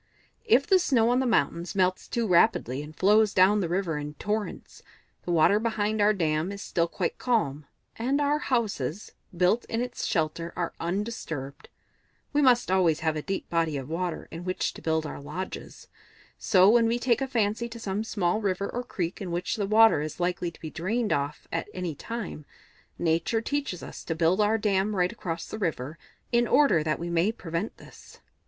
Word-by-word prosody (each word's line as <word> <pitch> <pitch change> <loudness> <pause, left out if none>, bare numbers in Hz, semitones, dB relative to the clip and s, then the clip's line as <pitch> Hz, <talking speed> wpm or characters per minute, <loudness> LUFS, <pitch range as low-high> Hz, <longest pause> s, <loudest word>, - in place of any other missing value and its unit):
"If 280 - +4
the 380 - +5
snow 240 -9 +3
on 250 - +3
the 260 - +1
mountains 180 -5 0
melts 185 -1 +1
too 235 -1 -1
rapidly, 145 - +3
and 150 +1 -10
flows 210 +2 +4
down 190 +3 +5
to - - +1
the 170 - -2
river 175 -4 -1
in 150 0 -6
torrents, 210 +4 -4 0.4
the 175 - -2
water 170 +5 +4
behind 220 -1 0
our 205 +1 +5
dam 165 -2 0
is 200 - -7
still 170 -1 0
quite 175 +1 -3
calm, 150 - 0 0.3
and 260 +5 0
our 290 +1 +2
houses, 210 - -2 0.3
built 185 +7 +3
in 225 - -3
its 245 0 -3
shelter, 165 0 -1
are 175 -2 -2
undisturbed. 170 -7 -4 0.6
We 295 - +3
must 245 -7 +4
always 175 -5 +3
have 160 -1 0
a 155 - -2
deep 195 +5 -4
body 165 -3 +1
of 135 +1 -6
water 175 +1 -3
in 165 +1 -7
which 185 0 -2
to - - -11
build 160 -1 0
our 150 - -6
lodges; 185 +6 -7 0.5
so 185 -1 +5
when 230 +2 +5
we 230 +1 +1
take 240 0 +1
a 270 - 0
fancy 230 -1 0
to 230 - -8
some 205 -1 -2
small 210 -2 0
river 200 -1 -1
or 245 - -3
creek 180 -7 -4
in 190 - -4
which 175 +5 -2
the 205 -3 -2
water 220 -6 +6
is 155 +2 -5
likely 175 0 -1
to 165 - -17
be 155 - -6
drained 210 +7 -1
off 145 +1 -3
at 165 +4 -3
any 180 -3 -3
time, 205 -1 -6 0.5
Nature 170 +7 +1
teaches 275 -5 -3
us - - -9
to 165 - -2
build 170 +5 +2
our 210 +2 +3
dam 205 -1 +1
right 180 -1 +2
across 165 -2 -5
the 215 - -6
river, 155 -5 -3 0.3
in 240 0 +3
order 275 - +4
that 155 0 0
we 170 0 -5
may 170 +5 +2
prevent 170 -1 -4
this." - - -15
190 Hz, 195 wpm, -27 LUFS, 165-225 Hz, 0.6 s, water